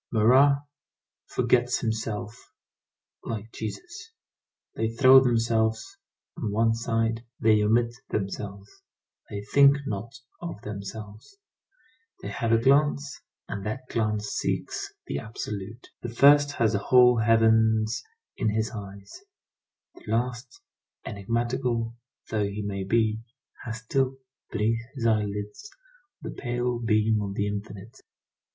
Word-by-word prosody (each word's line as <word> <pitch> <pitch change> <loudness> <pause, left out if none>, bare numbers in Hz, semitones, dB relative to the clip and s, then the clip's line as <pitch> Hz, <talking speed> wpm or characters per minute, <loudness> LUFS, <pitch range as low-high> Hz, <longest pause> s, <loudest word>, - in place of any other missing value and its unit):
Marat 135 +6 +5 0.6
forgets 125 0 +1
himself 110 -1 -3 0.9
like 110 0 -5
Jesus. 345 - -7 0.6
They 110 0 -1
throw 130 +3 +7
themselves 115 -3 0 0.4
on 105 - -3
one 115 +2 +2
side, 115 0 -1 0.2
they 110 -1 +4
omit 115 +3 +2 0.2
themselves, 100 0 -4 0.6
they 100 0 -5
think 140 +6 +5
not 105 0 -4 0.3
of 170 -11 -6
themselves. 105 - -8 0.9
They 100 - -4
have 115 +3 -2
a 115 - +6
glance, 140 +3 +2 0.3
and 100 -1 -5
that 130 +4 -5
glance 105 -2 -1
seeks - - -3
the 70 - -3
absolute. 105 +2 -7
The 120 - -4
first 145 +4 +5
has 115 -5 +1
the 100 - +1
whole 125 +3 +5
heavens 110 0 +3 0.4
in 110 - +1
his 110 +1 -1
eyes; 100 - -9 0.7
the - - -17
last, 120 +2 -2 0.4
enigmatical 115 +2 -2 0.4
though 105 -2 +1
he 100 +1 -5
may 100 -1 -3
be, 110 +2 +1 0.5
has 115 0 -6
still, 130 +2 0 0.3
beneath 115 +1 0
his 120 -4 -3
eyelids, 105 - -1 0.5
the - - -5
pale 120 -1 -2
beam 110 -1 +2
of 100 -1 -4
the 100 - 0
infinite. 105 +3 -6
115 Hz, 120 wpm, -26 LUFS, 105-120 Hz, 0.9 s, throw